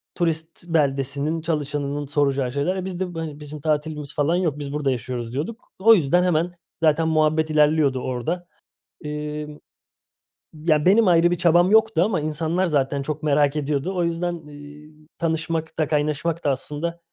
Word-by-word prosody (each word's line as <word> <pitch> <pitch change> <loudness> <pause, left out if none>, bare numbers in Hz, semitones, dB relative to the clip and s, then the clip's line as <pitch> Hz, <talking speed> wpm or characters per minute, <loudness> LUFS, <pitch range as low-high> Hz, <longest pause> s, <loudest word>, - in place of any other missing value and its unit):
turist 165 0 -2
beldesinin, 145 0 0
çalışanının 145 -2 -2
soracağı 140 -3 0
şeyler. 145 +8 -1
E 185 -1 -4
biz 185 -1 -5
de, 180 -2 -3
bu, - - -3
hani 155 -3 -5
"Bizim 150 0 -9
tatilimiz 150 -1 -2
falan 150 +4 +2
yok, 165 -5 0
biz 145 -1 -5
burada 145 -2 0
yaşıyoruz." 120 -1 -4
diyorduk. 170 - -5
O 225 +4 +7
yüzden 175 0 +2
hemen 175 0 +1 0.3
zaten 160 +1 +3
muhabbet 155 0 +2
ilerliyordu 150 -3 +3
orada. 155 +9 -3 0.6
Emm, 150 0 -5 1.0
ya 155 -1 +1
benim 205 +4 +5
ayrı 175 0 +5
bir 175 - 0
çabam 175 +3 +4
yoktu 220 -5 +4
ama 195 -7 0
insanlar 160 +4 -1
zaten 140 -4 0
çok 155 +2 -4
merak 145 -1 +2
ediyordu. 150 +5 -1
O 175 - +1
yüzden, 170 -1 -2
eee, 145 +1 -12 0.3
tanışmak 160 -1 -2
da 155 -3 +1
kaynaşmak 155 +2 -1
da, 145 - +3
aslında, 150 +6 -4
155 Hz, 160 wpm, -23 LUFS, 145-170 Hz, 1.0 s, O